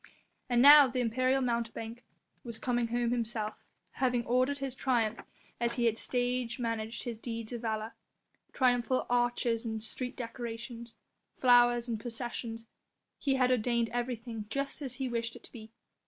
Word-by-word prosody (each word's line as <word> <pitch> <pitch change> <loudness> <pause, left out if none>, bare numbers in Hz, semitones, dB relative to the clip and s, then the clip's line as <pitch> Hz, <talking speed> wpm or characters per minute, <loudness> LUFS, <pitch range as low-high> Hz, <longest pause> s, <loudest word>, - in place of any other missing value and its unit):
And 240 0 +4
now 290 0 +10
the 255 0 -2
imperial 255 +3 +1
mountebank 235 -1 -3 0.4
was 235 -2 -6
coming 240 -1 0
home 240 0 0
himself, 225 -3 -3 0.3
having 245 -3 0
ordered 255 +4 +2
his 275 -2 -4
triumph 235 -4 0 0.4
as 235 0 0
he 240 - +1
had 225 -1 +2
stage 245 -1 -1
managed 230 -2 -3
his 235 -3 -5
deeds 230 0 -5
of 235 - -4
valour. 220 -1 -3 0.6
Triumphal 250 -1 +2
arches 240 -1 +1
and 220 -2 -4
street 250 +3 -5
decorations, 235 -1 -6 0.4
flowers 240 -1 +5
and 225 -2 -2
processions, 230 -1 -5 0.5
he 275 -2 +1
had 255 -1 +3
ordained 235 -1 +1
everything 235 -3 -3
just 275 +5 -3
as 260 -3 -4
he 265 0 -2
wished 230 -2 -2
it - - -12
to - - -11
be. 220 -2 -11
240 Hz, 155 wpm, -31 LUFS, 230-250 Hz, 0.6 s, now